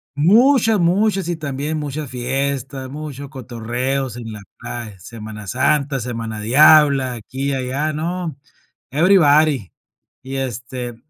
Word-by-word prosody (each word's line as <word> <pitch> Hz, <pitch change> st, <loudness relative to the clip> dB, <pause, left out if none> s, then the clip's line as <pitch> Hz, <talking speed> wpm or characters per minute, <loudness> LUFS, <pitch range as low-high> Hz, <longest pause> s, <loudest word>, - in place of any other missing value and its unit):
Muchas, 225 Hz, -, +4 dB
muchas, 190 Hz, +2 st, +2 dB
y 175 Hz, -, -1 dB
también 150 Hz, +1 st, -3 dB
mucha 150 Hz, +1 st, -4 dB
fiesta, 135 Hz, +1 st, -3 dB
mucho 140 Hz, -1 st, -7 dB
cotorreos 125 Hz, +1 st, -3 dB
en 115 Hz, -2 st, -7 dB
la 105 Hz, -1 st, -8 dB, 0.2 s
playa, 110 Hz, -6 st, -7 dB
Semana 110 Hz, +1 st, -9 dB
Santa, 140 Hz, +3 st, +1 dB
Semana 115 Hz, -2 st, -5 dB
Diabla, 135 Hz, +2 st, +5 dB
aquí 130 Hz, +5 st, -4 dB
y -, -, 0 dB
allá, 135 Hz, +4 st, -2 dB
¿no? 165 Hz, 0 st, -3 dB, 0.5 s
Everybody. 150 Hz, -, +4 dB, 0.5 s
Y, 135 Hz, +1 st, -7 dB
este, 125 Hz, -1 st, -4 dB
135 Hz, 120 wpm, -20 LUFS, 120-155 Hz, 0.5 s, Diabla